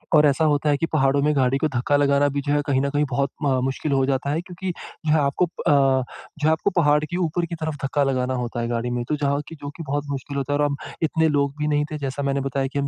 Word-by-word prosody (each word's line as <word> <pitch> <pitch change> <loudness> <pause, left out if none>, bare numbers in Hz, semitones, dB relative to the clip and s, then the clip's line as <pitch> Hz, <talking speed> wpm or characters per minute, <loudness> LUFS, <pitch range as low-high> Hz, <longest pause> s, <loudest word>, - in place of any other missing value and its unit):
और 150 - +6
ऐसा 150 +3 +2
होता 150 0 +2
है 145 - +3
कि 165 - 0
पहाड़ों 140 -1 +3
में 150 0 +2
गाड़ी 130 0 +2
को 155 - +1
धक्का 125 +4 +1
लगाना 145 0 +3
भी 140 - 0
जो 145 +1 -1
है 145 - +2
कहीं 135 -1 +2
न 140 - 0
कहीं 145 +1 +1
बहुत 140 +2 0
म 135 -2 +2
मुश्किल 135 +3 -2
हो 135 -1 +3
जाता 135 +1 -1
है, 155 +3 0
क्योंकि 180 +1 -5 0.3
जो 150 - +2
है 160 - +4
आपको 145 +5 +2
अ, 170 - -4 0.7
जो 150 - +1
है 160 - +5
आपको 160 +5 +1
पहाड़ 150 -3 +4
के 175 +3 -4
ऊपर 170 -1 0
की 170 - -5
तरफ 160 -1 -3
धक्का 140 +1 +1
लगाना 130 -1 0
होता 120 -1 -3
है 115 - -2
गाड़ी 120 0 -2
में, 120 0 -1
तो 150 - +2
जहाँ 140 -1 0
की 165 - -9
जो 145 -1 -7
कि 165 - -6
बहुत 145 +1 -1
मुश्किल 140 +1 -4
होता 140 +1 -1
है 145 - 0
और 145 - +3
हम 140 - 0 0.3
इतने 160 +1 +2
लोग 140 -1 +1
भी 150 - 0
नहीं 150 0 +1
थे 155 - -3
जैसा 140 0 -3
मैंने 140 0 0
बताया 135 0 -1
कि 140 - -1
हम 140 - 0
145 Hz, 295 wpm, -23 LUFS, 135-150 Hz, 0.7 s, और